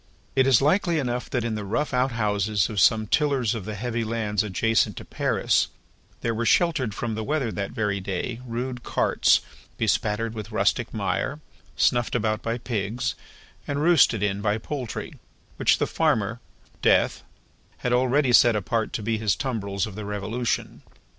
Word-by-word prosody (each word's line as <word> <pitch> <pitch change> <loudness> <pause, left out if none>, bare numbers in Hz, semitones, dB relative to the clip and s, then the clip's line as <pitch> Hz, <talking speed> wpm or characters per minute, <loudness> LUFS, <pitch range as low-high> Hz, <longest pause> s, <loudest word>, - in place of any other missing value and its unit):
It 130 0 +4
is 135 0 +5
likely 170 +2 +2
enough 125 -4 -2
that 120 -3 -1
in 115 -1 -2
the 105 -1 -3
rough 120 +9 -2
outhouses 105 -5 +1
of 105 - -1
some 110 +5 +4
tillers 135 -2 +1
of 110 -5 -5
the 110 0 -5
heavy 115 +2 -2
lands 110 -2 -1
adjacent 110 +3 +1
to - - -7
Paris, - - +1 0.5
there 115 - 0
were 115 +1 -2
sheltered 130 - +2
from 115 -2 -3
the 110 0 -3
weather 140 -3 -1
that 100 -2 -3
very 105 -4 -1
day, 100 +5 -4
rude 125 +1 -4
carts, - - +2 0.4
bespattered 110 +2 0
with 110 -1 -7
rustic 110 - +1
mire, 140 +3 -2 0.4
snuffed 120 -2 +2
about 110 -1 0
by 115 +1 -2
pigs, 115 -1 -2 0.5
and 145 +1 -1
roosted 150 - +4
in 100 0 0
by 105 0 +1
poultry, 125 0 -5 0.4
which - - +3
the - - +1
Farmer, 110 +1 0 0.4
Death, - - +3 0.6
had 125 - +2
already 130 +1 +2
set 120 -1 +6
apart 110 +2 -1
to 110 - -3
be 110 0 -1
his 105 -3 +1
tumbrils 100 -7 -2
of 110 - -8
the 105 +2 -6
Revolution. 105 +4 -3
115 Hz, 165 wpm, -25 LUFS, 105-125 Hz, 0.6 s, set